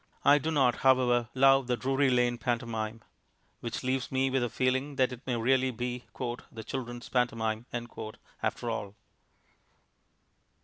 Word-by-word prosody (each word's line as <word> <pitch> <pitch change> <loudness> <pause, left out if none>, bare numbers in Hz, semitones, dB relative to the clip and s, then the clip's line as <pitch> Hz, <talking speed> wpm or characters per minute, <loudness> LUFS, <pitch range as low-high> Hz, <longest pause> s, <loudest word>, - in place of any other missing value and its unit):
I 145 +1 +7
do 155 - -2
not, 135 -6 +3
however, 125 -3 +3
love 135 0 +5
the 125 -1 +1
Drury 135 +2 +2
Lane 120 -1 +2
pantomime... 115 -2 -2 0.6
which 120 +2 -4
leaves 130 0 -1
me 135 0 +1
with 135 -1 +2
the 120 - 0
feeling 130 +4 0
that 130 -1 +2
it 125 - -9
may 125 - +1
really 130 +3 +2
be 125 0 -4 0.5
"the 110 -1 -8
children's 120 -1 -5
pantomime" 115 -2 0 0.7
after 120 - -1
all. 105 -3 -4
125 Hz, 140 wpm, -30 LUFS, 120-130 Hz, 0.7 s, I